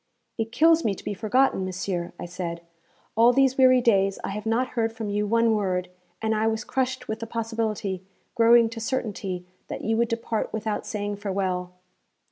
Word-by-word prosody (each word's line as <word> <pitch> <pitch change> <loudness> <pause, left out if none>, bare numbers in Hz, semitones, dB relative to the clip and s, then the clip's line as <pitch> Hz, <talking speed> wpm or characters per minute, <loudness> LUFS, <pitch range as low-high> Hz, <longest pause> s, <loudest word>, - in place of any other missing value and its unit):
'It 225 0 -1
kills 325 +6 +4
me 205 -3 +1
to - - -12
be - - -3
forgotten, 225 +1 +2
monsieur,' 185 -1 -3
I - - -5
said. 170 -1 -5 0.5
'All 230 +2 +6
these 265 0 +3
weary 255 -1 +6
days 195 -4 +3
I - - -3
have 210 +2 -5
not 245 +3 +1
heard 225 -2 0
from 225 -2 -5
you 210 +1 0
one 230 +1 +3
word, 185 -4 -1 0.3
and 220 0 +2
I 220 +1 +1
was 220 0 -1
crushed 255 -1 -2
with 220 - -3
the 230 - -5
possibility, 220 -4 -2 0.3
growing 235 0 +6
to 230 0 -7
certainty, 205 -7 -3 0.2
that - - -5
you 225 - +1
would 235 0 +2
depart 230 -1 -2
without 220 -1 -3
saying 205 -1 -3
farewell.' 190 -3 -2
220 Hz, 185 wpm, -25 LUFS, 195-235 Hz, 0.5 s, All